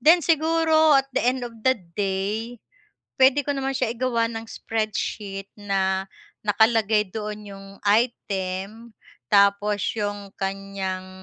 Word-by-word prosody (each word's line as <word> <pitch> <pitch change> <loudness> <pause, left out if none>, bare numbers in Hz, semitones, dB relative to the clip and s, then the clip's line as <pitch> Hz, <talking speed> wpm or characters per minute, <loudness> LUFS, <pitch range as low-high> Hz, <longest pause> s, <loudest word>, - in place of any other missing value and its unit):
Then 330 +5 +6
siguro 315 -1 +4
at 270 0 +1
the - - +1
end 250 0 +1
of 240 - -7
the 260 +3 +3 0.2
day, 205 +4 -2 0.6
pwede 270 +2 +5
ko 285 - 0
naman 270 0 -1
siya 250 -3 0
igawa 235 -1 0
ng 225 0 -5
spreadsheet 210 -3 -3
na 190 -2 0 0.4
nakalagay 220 0 +3
doon 210 +1 -6
'yong 195 0 -10 0.2
item 205 -1 -1 0.4
tapos 200 0 +3
'yong 205 -2 -4
kanyang, 195 -1 -4
215 Hz, 125 wpm, -24 LUFS, 195-250 Hz, 0.6 s, Then